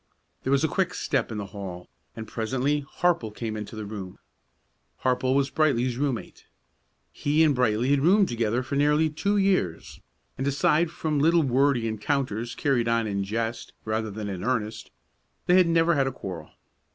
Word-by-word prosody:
There - - -4
was 140 +1 +3
a - - +4
quick 180 +1 -1
step 135 -4 -1
in 110 - -4
the 100 - -4
hall, 90 -3 -7 0.3
and 110 -1 -7
presently 130 +7 -1
Harple 165 -3 0
came 110 +1 -5
into 105 +1 -6
the 110 -1 -5
room. 100 -3 -7 0.9
Harple 130 0 +1
was 140 0 +1
Brightly's 130 -5 +1
room 140 0 0
mate. - - -11 0.6
He 150 +2 +2
and 155 -2 +4
Brightly 125 0 +1
had 140 - +4
roomed 190 +7 +4
together 115 +1 -1
for 130 +2 -4
nearly 150 +2 +3
two 200 +7 0
years, 185 - 0 0.4
and 135 - -1
aside 150 +4 +2
from 155 -2 -2
little 165 +3 +4
wordy 135 -2 +2
encounters 115 0 -2
carried 130 -6 +1
on 115 -1 +2
in 100 -2 -1
jest 115 +3 -3
rather 110 0 -1
than 105 0 -5
in 95 -2 -5
earnest, 110 -2 -2 0.6
they 180 - +3
had 185 -2 +5
never 165 0 +3
had 140 -4 +2
a - - -1
quarrel. 90 -10 -7
130 Hz, 175 wpm, -26 LUFS, 110-150 Hz, 0.9 s, had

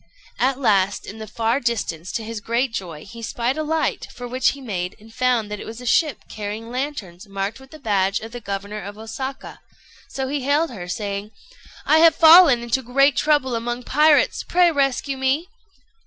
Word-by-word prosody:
At 260 +1 +2
last, 200 -6 +2
in 220 - -9
the 220 - -7
far 230 +4 0
distance, 200 - -2
to 225 - -2
his 225 0 -5
great 235 +3 -1
joy, 170 -7 -6
he 230 +3 -11
spied 235 +3 -2
a 310 - -2
light, 315 +1 -1
for 245 - -7
which 255 +2 +1
he 280 - -11
made, 185 -8 -4
and 220 +1 -16
found 245 -4 +1
that 210 - -4
it - - -8
was 225 +1 -8
a 250 - -9
ship 295 +2 +1
carrying 215 +2 -6
lanterns 235 -9 -5
marked 195 +4 -3
with 265 0 -16
the 310 - -12
badge 200 -6 0
of 225 +1 -9
the 245 0 -8
governor 200 +1 -5
of 200 +2 -8
Osaka; 245 +5 -7 0.5
so 265 -1 -3
he 285 +1 -2
hailed 285 +3 +1
her, 180 -7 -7
saying 200 +2 -4 0.6
"I 315 - +5
have 325 -1 +6
fallen 320 -7 +8
into 240 +2 0
great 275 +3 +3
trouble 290 -4 +2
among 240 +1 -3
pirates: 300 +3 +3
pray 350 -1 +3
rescue 275 -1 0
me." 270 +7 0
240 Hz, 195 wpm, -22 LUFS, 210-275 Hz, 0.6 s, fallen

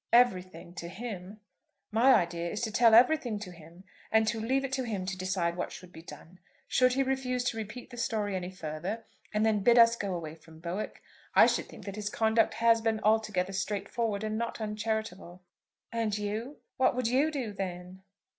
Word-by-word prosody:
"Everything, 185 -8 +2
to 170 - -6
him. 205 0 -7 0.5
My 245 +5 +6
idea 170 -3 0
is 210 - -4
to 225 -2 -2
tell 230 0 +6
everything 245 -2 +4
to 205 -3 -7
him, 170 +2 -15 0.3
and 220 0 +4
to 225 +1 -2
leave 260 +5 0
it 270 - -5
to 265 -1 -1
him 205 -6 -3
to 190 +1 -3
decide 185 -2 -1
what 180 - -3
should 180 0 -11
be 160 - -10
done. 165 +3 -13 0.3
Should 255 0 +3
he 270 +1 +2
refuse 260 -2 -1
to 240 -2 -1
repeat 225 +4 -7
the 245 - -9
story 215 -4 -1
any 180 -1 -3
further, 185 +5 -5 0.3
and 215 +1 +1
then 220 -2 +3
bid 235 +4 +4
us 230 0 +7
go 200 -5 -3
away 160 -3 -5
from 160 0 -16
Bowick, 175 +5 -5 0.3
I - - +9
should - - 0
think - - -12
that 200 0 -6
his 205 -1 -3
conduct 220 +1 +2
had 230 -1 +3
been 225 -1 +1
altogether 215 -4 +1
straightforward 200 +2 -2
and 215 0 -2
not 235 0 -3
uncharitable." 210 -4 -4 0.5
"And 225 -3 -1
you, 215 +7 -4 0.2
what 260 -2 +3
would 250 -2 0
you 265 +6 +3
do 260 -9 -4
then?" 185 -1 -6
215 Hz, 195 wpm, -30 LUFS, 185-230 Hz, 0.5 s, I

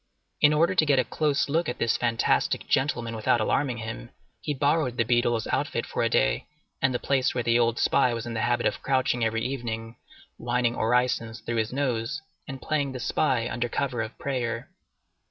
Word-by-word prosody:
In 145 - +7
order 160 +4 +3
to 175 - +4
get 140 -2 +4
a 130 - +4
close 150 +4 0
look 160 +2 0
at 125 - -4
this 115 - +1
fantastic 120 -2 +1
gentleman 120 -4 0
without 110 +2 +2
alarming 125 +3 0
him, 110 +1 -6 0.3
he 150 - -4
borrowed 145 -2 +1
the 115 - +3
beadle's 120 -1 +1
outfit - - -1
for - - -3
a - - +2
day, - - +1 0.3
and 130 - +3
the 125 - 0
place 130 0 0
where 125 - 0
the 115 +1 +3
old 115 -1 +2
spy 130 -3 +3
was 115 -1 -4
in 120 - -5
the 110 - -2
habit 120 +2 +1
of - - 0
crouching 130 -3 +1
every 115 0 0
evening, 115 -3 -4 0.4
whining 120 0 0
orisons 115 -1 0
through 120 - -3
his 110 0 0
nose, 130 0 -1 0.3
and 135 -1 -7
playing 145 -3 -1
the 130 - -5
spy 125 -2 +1
under 120 0 -2
cover 125 -2 -1
of 110 +2 -6
prayer. 120 -4 -3
120 Hz, 195 wpm, -26 LUFS, 115-135 Hz, 0.4 s, In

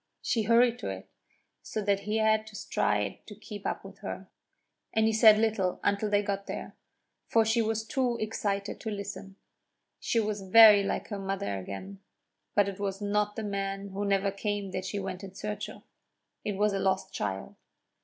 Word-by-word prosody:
She 230 - +1
hurried 235 +2 +4
to - - -4
it, 95 -1 -7 0.5
so - - -4
that 200 -1 +2
he 210 +2 -2
had 220 0 +2
to 215 - -11
stride 105 - -1
to 210 - -9
keep 205 -1 -7
up - - -3
with - - -11
her; - - -6 0.6
and 220 0 +3
he 220 - +2
said 215 -1 +8
little 215 -4 +1
until 205 +1 +1
they 205 0 +3
got 200 -1 -3
there, - - -6 0.5
for 225 -1 +4
she 225 +2 +2
was 220 0 0
too 255 -3 0
excited 205 -2 -2
to 220 - -4
listen. 200 -1 -6 0.6
She 230 - +1
was 210 -2 -1
very 210 +1 +8
like 195 - -2
her 205 -2 -4
mother 195 - -2
again; 185 - -7 0.6
but 205 -1 +4
it 200 0 -5
was 195 -1 -2
not 205 0 0
the 220 - -4
man 195 -1 -3
who 195 +1 -4
never 200 0 +1
came 200 -1 -3
that 185 0 -3
she 190 +2 -3
went 190 -1 -4
in 190 -1 -9
search 210 0 -4
of - - -12 0.6
it 210 - -2
was 205 +1 +1
a 195 - 0
lost 190 0 0
child. 95 -1 -3
205 Hz, 190 wpm, -29 LUFS, 195-215 Hz, 0.6 s, said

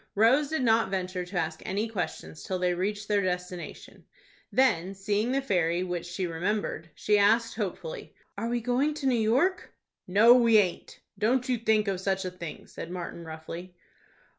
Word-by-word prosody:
Rose 255 +8 +4
did 315 -4 -1
not 225 -3 +3
venture 185 -1 -2
to 185 0 -5
ask 160 -1 -2
any 205 +4 -1
questions 185 -6 -5
till 185 - -3
they 180 0 +1
reached 200 +3 -2
their 205 -1 +2
destination. 180 -1 -5 0.5
Then 195 -8 +2
seeing 205 +4 0
the 275 +1 0
ferry, 175 -6 +1
which 175 -2 -4
she 175 +2 -3
remembered, 175 -1 -2
she 210 -1 +2
asked 225 +3 +3
hopefully, 240 - -5 0.2
"Are 230 - -3
we 240 0 -1
going 255 +6 +1
to 300 -2 -5
New 260 - +3
York?" 245 - +1 0.4
"No, 210 +6 +7
we 235 -3 +5
aint. 185 -4 0 0.2
Don't 250 +4 +2
you 250 -2 0
think 220 -2 +2
of 195 -2 -1
such 190 0 -1
a 185 - -3
thing," 170 -3 -8
said 165 - -8
Martin, 175 -1 -6
roughly. 165 +3 -8
205 Hz, 175 wpm, -28 LUFS, 180-230 Hz, 0.5 s, No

